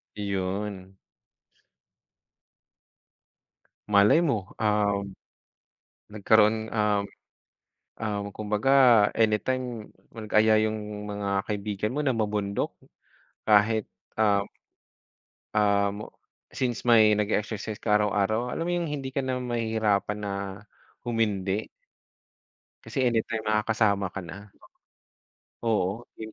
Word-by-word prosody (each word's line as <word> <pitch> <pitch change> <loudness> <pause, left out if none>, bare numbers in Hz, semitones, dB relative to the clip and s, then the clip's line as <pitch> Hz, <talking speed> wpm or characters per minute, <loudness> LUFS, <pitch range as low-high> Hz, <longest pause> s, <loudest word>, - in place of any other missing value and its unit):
Yon. 95 -1 -4 2.9
Malay 105 +11 +4
mo, 110 - -2
um, 105 -2 +1 1.1
nagkaroon 110 +1 +3
um, 105 -2 +1 1.0
ah, 105 -2 -3 0.2
kumbaga 105 +4 -1 0.5
anytime 115 +1 0 0.2
mag-aya 110 0 +3
yung 105 -1 -6
mga 100 -1 -2
kaibigan 105 +1 -3
mo 150 - -1
na 135 - +2
mamundok, 105 -3 -2 0.7
kahit, 110 0 +4 0.3
um, 100 -2 +3 1.1
um, 100 -1 +2 0.6
since 125 -3 -2
may 110 -3 +5
nag-e-exercise 105 0 -2
ka 105 - +1
araw-araw, 105 +3 +1
alam 165 - -3
mo 175 - -1
yung 170 -2 -1
hindi 135 -2 -5
ka 140 - 0
na 130 -1 -2
mahihirapan 110 -4 -1
na 100 -1 -3 0.7
humindi? 105 -3 -1 1.1
Kasi 130 - -1
any 115 -2 +1
time 110 -1 -4
nakakasama 105 -2 +1
ka 95 - -5
na. 95 +4 -10 1.2
Oo, 110 -1 0 0.2
yung 110 0 -8
105 Hz, 95 wpm, -26 LUFS, 100-110 Hz, 2.9 s, may